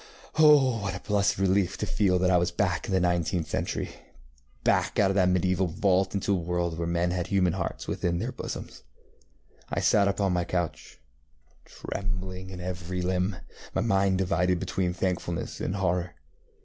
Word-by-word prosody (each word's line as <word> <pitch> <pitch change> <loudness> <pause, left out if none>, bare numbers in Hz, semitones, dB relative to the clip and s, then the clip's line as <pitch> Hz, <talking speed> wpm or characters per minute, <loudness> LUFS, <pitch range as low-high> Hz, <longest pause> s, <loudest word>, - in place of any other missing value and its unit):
Oh, 140 -6 +6
what 100 -2 -3
a - - -5
blessed 100 -1 +1
relief 95 0 +1
to - - -2
feel 95 -3 +2
that 90 +1 +2
I 90 - +5
was 85 0 +1
back 90 0 -1
in - - -4
the 95 - +3
nineteenth 85 -1 0
centuryŌĆöback - - -3
out 100 -2 +4
of - - 0
that 95 -2 +3
medieval 90 0 +1
vault 95 +3 +1
into 100 +1 0
a 95 - +1
world 85 0 -1
where 85 0 -3
men 85 +1 0
had 90 -1 -2
human 90 -4 +2
hearts 90 -2 -4
within 85 -1 -1
their - - -2
bosoms. - - -7 0.9
I - - -1
sat 100 -1 +4
up 100 0 -1
on 95 -2 +2
my 90 0 +1
couch, 85 -2 -4 0.7
trembling 95 -1 -5
in 95 -1 -8
every 90 0 -4
limb, 90 +2 0 0.4
my - - +2
mind 95 -3 +2
divided 90 -1 +1
between 90 0 -1
thankfulness 90 -1 -3
and 90 - -2
horror. 90 -3 -1
90 Hz, 175 wpm, -27 LUFS, 85-95 Hz, 0.9 s, Oh